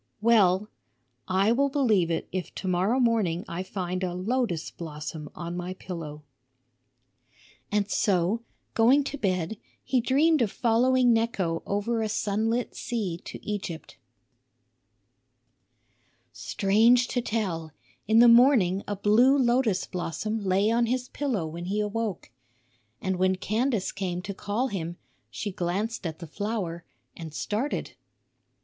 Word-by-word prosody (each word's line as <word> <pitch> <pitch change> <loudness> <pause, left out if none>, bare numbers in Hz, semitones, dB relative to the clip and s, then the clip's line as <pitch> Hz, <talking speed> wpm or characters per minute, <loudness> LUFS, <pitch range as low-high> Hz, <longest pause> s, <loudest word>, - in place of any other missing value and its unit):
Well, 210 -3 +4 0.6
I 190 +3 +3
will 280 +4 +2
believe 225 - +2
it 165 - -2
if 185 -1 -4
to 190 - -5
morrow 185 +8 +2
morning 215 -8 +1
I 170 +2 -4
find 185 -1 -4
a 175 -1 -2
lotus 200 -3 -1
blossom 150 -2 -7
on 170 0 -5
my 180 +1 -4
pillow." 160 -5 -7 1.5
And 205 -1 +1
so, 200 +1 +1 0.3
going 255 +6 +5
to 285 0 -5
bed, 185 -2 -1 0.3
he 255 -2 +1
dreamed 290 +5 +3
of 215 -4 +1
following 245 +1 +3
Necho 200 -8 0
over 225 +3 0
a 220 - -1
sunlit 220 +3 -1
sea 195 -8 -3
to - - -9
Egypt. 200 -6 -5 2.4
Strange 230 +5 +3
to 245 - 0
tell, 185 -9 -2 0.4
in 220 +1 +4
the 240 +1 +8
morning 235 -6 +5
a 205 - -2
blue 230 +8 +4
lotus 240 -6 +2
blossom 205 +5 -3
lay 195 +3 +2
on 235 0 +2
his 250 +1 -1
pillow 250 - -2
when 170 +2 -6
he 200 +3 -1
awoke. 210 - -3 0.7
And 190 -1 -1
when 185 +1 +2
Candace 220 +2 -1
came 180 -2 -3
to 200 - -5
call 210 +7 -2
him, 175 -4 -4 0.3
she 205 - -4
glanced 190 +3 -2
at 160 -1 -6
the 170 - -8
flower 175 -1 -4 0.3
and 165 -2 -8
started. 225 +8 -2
205 Hz, 135 wpm, -27 LUFS, 180-235 Hz, 2.4 s, the